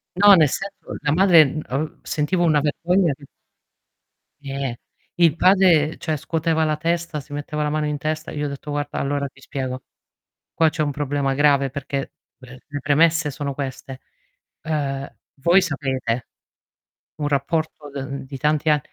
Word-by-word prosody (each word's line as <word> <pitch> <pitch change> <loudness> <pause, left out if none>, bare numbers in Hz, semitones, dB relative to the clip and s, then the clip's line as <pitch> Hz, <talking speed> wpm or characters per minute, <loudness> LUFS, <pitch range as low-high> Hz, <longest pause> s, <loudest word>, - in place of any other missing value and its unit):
No, 205 +2 +8
nel 155 -5 +5
senso, 195 +5 -6
la 145 - 0
madre, 170 -1 +7
uhm, 150 +2 -3
ehm, 150 +4 -3
sentivo 175 +4 0
una 155 -3 +3
vergogna 170 +3 +1
che 140 +1 -14 1.2
Eh, 135 -3 -4 0.4
il 170 -3 +4
padre 180 -4 +4
cioè 155 -2 -2
scuoteva 160 +2 0
la 155 -1 0
testa, 170 -1 -1
si 145 +1 -11
metteva 145 +1 -4
la 150 - 0
mano 150 0 -1
in 150 - -2
testa. 155 +2 -3
Io 150 0 -3
ho - - 0
detto: 140 +1 -7
"Guarda, 145 0 -3
allora 140 0 -1
ti 135 0 -19
spiego. 130 -3 -5 0.7
Qua 160 -1 +4
c'è 155 +1 -3
un 145 - -1
problema 140 -1 -1
grave 140 -1 +3
perché, 140 +1 -4 0.2
beh, 130 -1 -13
le 145 -1 -5
premesse 155 +1 +3
sono 140 -1 -4
queste: 135 -1 -6 0.6
ehm, 140 -3 -2 0.3
voi 175 +5 +5
sapete, 135 -7 -2 0.9
un 150 -2 -2
rapporto 145 +1 -2
de 140 - -5
uhm, 135 0 -6
di 135 - -7
tanti 150 +2 +1
ann" 150 - +4
150 Hz, 165 wpm, -22 LUFS, 140-160 Hz, 1.2 s, No